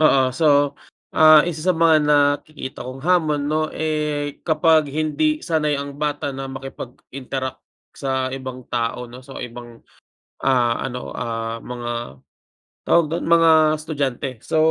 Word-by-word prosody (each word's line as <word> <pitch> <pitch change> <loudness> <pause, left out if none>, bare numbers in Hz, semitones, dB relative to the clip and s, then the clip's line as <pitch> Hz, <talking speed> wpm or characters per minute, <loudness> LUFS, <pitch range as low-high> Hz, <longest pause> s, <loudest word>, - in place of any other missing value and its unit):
Oo. 135 -4 +4
So, 145 -1 +3 0.4
ah, 155 -1 +7
isa 165 -3 -4
sa 185 - +4
mga 165 -1 +5
nakikita 145 -1 +1
kong 130 +2 -7
hamon 160 -5 +2
'no, 155 +1 0
eh, 150 -2 -2
kapag 160 -1 +3
hindi 155 - 0
sanay 150 -3 +1
ang 140 0 -6
bata 145 -1 -2
na 135 0 -6
makipag-interact 135 0 -7 0.3
sa 130 -1 -2
ibang 130 -1 -7
tao 120 0 -1
'no, 125 +1 -11
sa 135 +1 -12
ibang, 120 -1 -11 0.6
ah, 125 -3 +3
ano, 125 -1 -5
ah, 115 0 -3
mga, 120 0 -6 0.9
tawag 170 -1 +3
do'n, 170 - -2
mga 165 -1 +6 0.3
estudyante. 140 -4 -3
So, - - -2
145 Hz, 135 wpm, -21 LUFS, 130-155 Hz, 0.9 s, ah